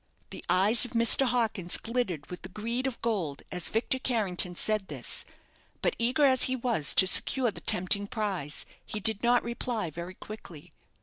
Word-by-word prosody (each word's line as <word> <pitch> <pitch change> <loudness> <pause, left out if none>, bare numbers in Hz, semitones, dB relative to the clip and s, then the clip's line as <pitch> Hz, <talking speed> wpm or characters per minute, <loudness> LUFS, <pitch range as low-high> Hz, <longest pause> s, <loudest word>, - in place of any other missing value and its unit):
The - - -10
eyes 205 +6 +5
of 245 - +2
Mr. 235 +3 +5
Hawkins 225 -7 0
glittered 225 - -4
with 180 - -8
the 190 - -9
greed 235 +6 -4
of 255 - -6
gold 185 -12 -3
as 180 -2 0
Victor 235 +4 -1
Carrington 195 -8 -1
said 215 +1 -1
this; - - -3 0.6
but, - - 0
eager 255 +5 +1
as 260 -2 +5
he 260 - -1
was 235 - +1
to 190 - +7
secure 245 +5 +2
the - - -11
tempting 200 +3 +1
prize, 195 -10 -4 0.2
he 215 - -6
did 215 0 +2
not 245 0 +2
reply 235 -6 -4
very 170 +4 -8
quickly. 175 -9 -12
215 Hz, 175 wpm, -27 LUFS, 185-240 Hz, 0.6 s, to